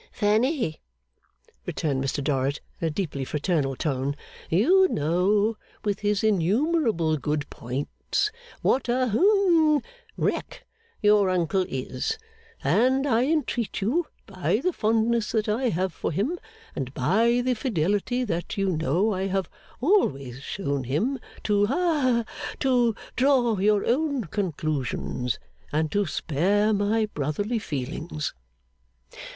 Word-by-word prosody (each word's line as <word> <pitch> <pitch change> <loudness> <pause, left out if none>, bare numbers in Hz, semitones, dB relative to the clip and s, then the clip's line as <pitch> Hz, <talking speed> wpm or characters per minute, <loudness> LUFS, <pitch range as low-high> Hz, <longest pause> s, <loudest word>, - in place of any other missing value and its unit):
'Fanny,' 220 - +1 0.9
returned 135 -4 -1
Mr 135 +1 -2
Dorrit 140 0 0 0.2
in 165 - +1
a - - +1
deeply 150 -5 -3
fraternal 150 -1 0
tone, 140 0 -1 0.3
'you 360 - +5
know, 200 - +1 0.3
with 205 -2 0
his 210 0 0
innumerable 215 - +2
good 150 0 -2
points, 135 - -2 0.3
what 255 -1 +2
a 250 +1 +2
hum 335 - +4 0.4
wreck - - -2 0.4
your 205 -2 +5
uncle 185 +1 +1
is; 130 -1 -3 0.5
and, 250 - +3
I 245 -2 +3
entreat 275 - -1
you 285 - 0 0.2
by 190 0 0
the 365 - +1
fondness 225 -1 +1
that 220 -1 +1
I 235 +4 +1
have 185 -1 -1
for - - -3
him, 245 - -1 0.4
and 130 -2 -3
by 225 - +3
the 250 +1 +1
fidelity 215 - 0
that 175 -1 -3
you 195 -1 +1
know 170 +8 +1
I 190 +1 -1
have 190 -2 -2 0.3
always 140 - +1
shown 140 -5 -3
him, 210 - 0 0.2
to 205 -1 +2
ha 275 -5 +2 0.4
to 245 -4 +3 0.2
draw 250 -3 +3
your 205 +1 +3
own 280 0 +1
conclusions, 150 - -2 0.3
and 155 +1 0
to 205 -2 +1
spare 200 +9 +1
my 210 +2 +2
brotherly 205 - -2
feelings. 150 0 -4
205 Hz, 125 wpm, -26 LUFS, 155-245 Hz, 0.9 s, you